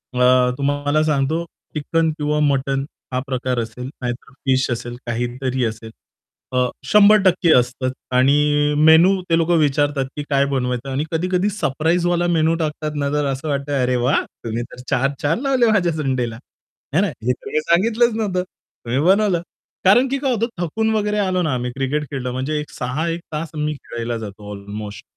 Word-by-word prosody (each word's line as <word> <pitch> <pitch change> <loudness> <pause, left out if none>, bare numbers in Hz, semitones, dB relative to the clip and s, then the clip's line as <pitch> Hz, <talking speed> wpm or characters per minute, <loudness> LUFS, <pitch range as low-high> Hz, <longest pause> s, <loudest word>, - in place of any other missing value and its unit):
अ, 125 0 +4
तुम्हाला 145 +2 +1
सांगतो 155 +2 0 0.3
चिकन 160 +2 0
किंवा 150 0 0
मटण 135 -2 +1 0.3
हा 125 - +1
प्रकार 130 -1 -1
असेल. 115 +3 -5
नाहीतर 125 +1 -5
फिश 130 -1 +2
असेल 120 0 -4
काहीतरी 125 +2 -2
असेल 110 0 -5 0.6
अ, 125 0 +2 0.2
100% 200 -4 +5
असतंच. 125 +1 -2 0.2
आणि 145 +3 +3
मेन्यू 175 +4 +6
ते 165 - +4
लोक 165 0 0
विचारतात, 145 -1 +1
की 150 - -4
काय 140 -1 +3
बनवायचं. 130 -1 -2
आणि 135 +3 -1
कधी-कधी 180 +4 +1
सरप्राईजवाला 175 0 0
मेन्यू 165 -1 +2
टाकतात 155 -1 -2
ना, 140 -1 -1
तर 150 -1 +1
असं 135 +3 -5
वाटतं 140 -1 -1
"अरे 125 0 +1
वाह! 140 - +3 0.2
तुम्ही 115 +1 -2
तर 125 - -10
चार 135 0 +2
चाँद 160 +10 0
लावले" 270 -3 +2
"माझ्या 180 -5 +2
संडेला." 130 -7 -2 0.6
है 185 - +5
ना. 205 - +2
हे 125 - -2
तुम्ही 155 - -3
सांगितलंच 220 +8 +2
नव्हतं, 195 -5 -1
तुम्ही 130 -8 -6
बनवलं. 195 -3 +3 0.4
कारण 240 +8 +6
की 275 - 0
काय 270 -2 0
होतं, 230 0 0
थकून 215 +6 0
वगैरे 210 0 0
आलो 185 -2 +1
ना 160 -5 0
आम्ही 125 0 -2
क्रिकेट 135 +3 -1
खेळलं. 125 -3 -3
म्हणजे 135 +4 -2
एक 150 - -7
6 135 +6 -3
एक 165 +1 -3
तास 155 +1 -3
मी 150 0 -1
खेळायला 120 -3 -5
जातो 105 -1 -8
अल्मोस्ट. 100 +1 -7
145 Hz, 170 wpm, -20 LUFS, 125-170 Hz, 0.6 s, मेन्यू